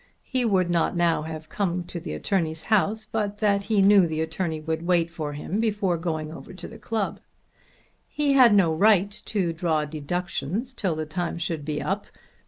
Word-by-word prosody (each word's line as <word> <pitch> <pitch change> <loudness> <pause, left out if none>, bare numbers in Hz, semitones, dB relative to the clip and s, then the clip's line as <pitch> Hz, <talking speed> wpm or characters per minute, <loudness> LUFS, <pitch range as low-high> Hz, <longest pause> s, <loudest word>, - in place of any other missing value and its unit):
He 255 -2 0
would 185 -5 +2
not 170 +1 +1
now 170 -2 +2
have 155 0 -7
come 180 -1 -1
to 175 0 -7
the 170 - -6
attorney's 160 -5 -1
house 215 +2 +2
but 205 -2 -1
that 200 -2 +1
he 205 -2 +3
knew 195 -2 +6
the 160 0 -2
attorney 160 0 -2
would 160 +1 -3
wait 170 -1 +1
for 155 -3 -4
him 165 +7 -3
before 205 -5 +1
going 160 -2 -3
over 165 - -10
to - - -8
the 225 - -12
club. 220 -2 -2 0.9
He 290 -2 +1
had 255 -4 +7
no 190 -6 +4
right 200 +2 +4
to 185 -6 -1
draw 160 -2 0
deductions 175 - -3
till 190 -9 -1
the 155 0 -3
time 170 +2 -3
should 165 -3 -3
be 150 0 -3
up. 200 +2 -2
175 Hz, 190 wpm, -25 LUFS, 160-205 Hz, 0.9 s, had